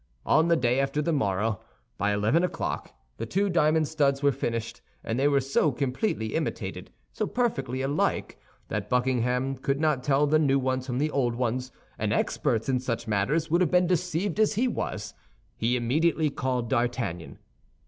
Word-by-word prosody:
On 160 Hz, +1 st, +4 dB
the 170 Hz, -, +4 dB
day 125 Hz, -4 st, +1 dB
after 135 Hz, +2 st, 0 dB
the 160 Hz, +2 st, 0 dB
morrow, 105 Hz, -5 st, 0 dB, 0.4 s
by 105 Hz, 0 st, +1 dB
eleven 105 Hz, +12 st, +2 dB
o'clock, 165 Hz, -, -3 dB, 0.3 s
the 115 Hz, -, -4 dB
two 195 Hz, -, +1 dB
diamond 155 Hz, -2 st, +3 dB
studs 140 Hz, -3 st, +1 dB
were 140 Hz, -, +5 dB
finished, 115 Hz, -2 st, -3 dB, 0.2 s
and 115 Hz, +2 st, -2 dB
they 140 Hz, -, +4 dB
were 140 Hz, -1 st, +3 dB
so 135 Hz, +3 st, +1 dB
completely 125 Hz, -, -2 dB
imitated, -, -, -3 dB, 0.2 s
so -, -, -2 dB
perfectly 135 Hz, -, -1 dB
alike, 140 Hz, +2 st, -1 dB, 0.3 s
that -, -, -3 dB
Buckingham 125 Hz, +1 st, +1 dB
could 135 Hz, +2 st, -1 dB
not 155 Hz, -4 st, +1 dB
tell 145 Hz, +1 st, +3 dB
the 155 Hz, +1 st, +3 dB
new 140 Hz, -3 st, +3 dB
ones 130 Hz, 0 st, -1 dB
from 125 Hz, -1 st, -2 dB
the 150 Hz, +3 st, 0 dB
old 125 Hz, -5 st, 0 dB
ones, 125 Hz, +1 st, -2 dB, 0.3 s
and -, -, 0 dB
experts 115 Hz, -1 st, 0 dB
in 130 Hz, -2 st, +1 dB
such 115 Hz, -2 st, -3 dB
matters 125 Hz, +11 st, 0 dB
would 170 Hz, +2 st, +3 dB
have 175 Hz, -, +3 dB
been 180 Hz, 0 st, +4 dB
deceived 180 Hz, +3 st, -1 dB
as 215 Hz, 0 st, +3 dB
he 245 Hz, +5 st, +2 dB
was. 245 Hz, -, -4 dB, 0.4 s
He 120 Hz, +2 st, 0 dB
immediately 155 Hz, +5 st, +1 dB
called 125 Hz, -3 st, -2 dB
D'Artagnan. 120 Hz, -9 st, -2 dB
135 Hz, 175 wpm, -27 LUFS, 120-155 Hz, 0.4 s, were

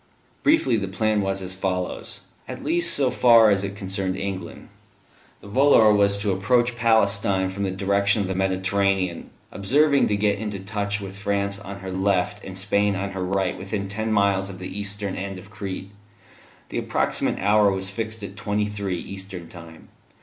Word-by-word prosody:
Briefly, 210 Hz, -, +3 dB
the 100 Hz, -2 st, -2 dB
plan 105 Hz, +3 st, 0 dB
was 95 Hz, 0 st, -2 dB
as 90 Hz, 0 st, -4 dB
follows, 90 Hz, -1 st, -3 dB, 0.3 s
at -, -, -7 dB
least 170 Hz, +3 st, +3 dB
so 135 Hz, -3 st, +2 dB
far 115 Hz, -3 st, +6 dB
as 100 Hz, -1 st, +2 dB
it 100 Hz, 0 st, -4 dB
concerned 95 Hz, -1 st, -2 dB
England. 95 Hz, -3 st, -6 dB, 0.7 s
The -, -, -12 dB
volor 110 Hz, -1 st, +5 dB
was 100 Hz, -1 st, +4 dB
to 100 Hz, 0 st, -1 dB
approach 120 Hz, +6 st, +1 dB
Palestine 100 Hz, -4 st, +2 dB
from 95 Hz, +2 st, -6 dB
the -, -, -1 dB
direction 100 Hz, +2 st, +1 dB
of -, -, -3 dB
the 95 Hz, -, -2 dB
Mediterranean, 95 Hz, -1 st, 0 dB, 0.2 s
observing 140 Hz, +8 st, +3 dB
to 105 Hz, -, 0 dB
get 100 Hz, -1 st, +1 dB
into 105 Hz, -2 st, -4 dB
touch 100 Hz, +1 st, -3 dB
with 100 Hz, 0 st, -8 dB
France 100 Hz, 0 st, -1 dB
on 100 Hz, 0 st, -9 dB
her 95 Hz, 0 st, -6 dB
left 95 Hz, 0 st, 0 dB
and 95 Hz, 0 st, -7 dB
Spain 100 Hz, +1 st, +1 dB
on 100 Hz, 0 st, -3 dB
her 95 Hz, -1 st, -4 dB
right 95 Hz, -1 st, 0 dB
within 100 Hz, +1 st, -4 dB
ten 110 Hz, +3 st, -3 dB
miles 100 Hz, -2 st, +2 dB
of 95 Hz, -, -8 dB
the 95 Hz, +1 st, -7 dB
eastern 100 Hz, -1 st, -3 dB
end 95 Hz, 0 st, -5 dB
of 95 Hz, +3 st, -13 dB
Crete. 100 Hz, -2 st, -6 dB, 0.8 s
The -, -, -2 dB
approximate -, -, -1 dB
hour 105 Hz, 0 st, +4 dB
was 95 Hz, 0 st, 0 dB
fixed 110 Hz, 0 st, -4 dB
at 100 Hz, 0 st, -7 dB
twenty 105 Hz, +1 st, -1 dB
three 100 Hz, -3 st, -3 dB
(eastern 95 Hz, -2 st, -8 dB
time). 85 Hz, -2 st, -13 dB
100 Hz, 180 wpm, -23 LUFS, 95-105 Hz, 0.8 s, far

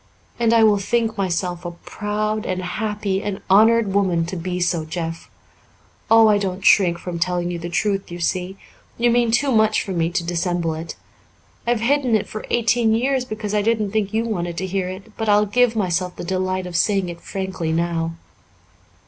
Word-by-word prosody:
"And 230 Hz, -1 st, +3 dB
I 230 Hz, -1 st, +5 dB
will 210 Hz, -2 st, +4 dB
think 225 Hz, +2 st, 0 dB
myself 180 Hz, -2 st, -2 dB
a 175 Hz, -, -4 dB
proud 210 Hz, +4 st, -3 dB
and 185 Hz, 0 st, -2 dB
happy 205 Hz, 0 st, -2 dB
and 200 Hz, -2 st, -4 dB
honoured 220 Hz, 0 st, +5 dB
woman 185 Hz, -4 st, +2 dB
to 175 Hz, -, -5 dB
be 180 Hz, +1 st, -3 dB
so, 175 Hz, -2 st, 0 dB
Jeff. 165 Hz, +1 st, -5 dB, 0.8 s
Oh, 225 Hz, 0 st, +7 dB
I 210 Hz, -1 st, +4 dB
don't 190 Hz, -1 st, -3 dB
shrink 175 Hz, -4 st, +5 dB
from 170 Hz, 0 st, -6 dB
telling 175 Hz, 0 st, 0 dB
you 170 Hz, -, -4 dB
the 170 Hz, +1 st, -5 dB
truth, 195 Hz, +2 st, -1 dB
you 175 Hz, 0 st, -7 dB
see. 185 Hz, +2 st, -2 dB, 0.4 s
You 240 Hz, 0 st, +3 dB
mean 240 Hz, 0 st, +2 dB
too 265 Hz, +5 st, +2 dB
much 220 Hz, -2 st, +3 dB
to 195 Hz, -, -5 dB
me -, -, -2 dB
for 175 Hz, -, -2 dB
me 165 Hz, 0 st, +1 dB
to 175 Hz, 0 st, -2 dB
dissemble 175 Hz, -1 st, -1 dB
it. 160 Hz, +1 st, -6 dB, 0.7 s
I've 240 Hz, -2 st, +1 dB
hidden 255 Hz, -1 st, +2 dB
it 215 Hz, -, 0 dB
for 215 Hz, -, -7 dB
eighteen 230 Hz, -1 st, +2 dB
years 260 Hz, +2 st, 0 dB
because 215 Hz, -3 st, -5 dB
I 210 Hz, -, +2 dB
didn't 215 Hz, -2 st, 0 dB
think 210 Hz, -2 st, -1 dB
you 220 Hz, +1 st, 0 dB
wanted 175 Hz, -6 st, -3 dB
to 190 Hz, -, -2 dB
hear 185 Hz, -1 st, -2 dB
it, 195 Hz, +4 st, -10 dB
but 225 Hz, -1 st, -1 dB
I'll 210 Hz, 0 st, +5 dB
give 240 Hz, +2 st, +2 dB
myself 180 Hz, -3 st, -1 dB
the -, -, -7 dB
delight 185 Hz, +1 st, -1 dB
of 180 Hz, -1 st, -7 dB
saying 195 Hz, +1 st, +2 dB
it 170 Hz, -1 st, -8 dB
frankly 190 Hz, -4 st, -4 dB
now." 165 Hz, 0 st, -1 dB
195 Hz, 200 wpm, -21 LUFS, 175-220 Hz, 0.8 s, Oh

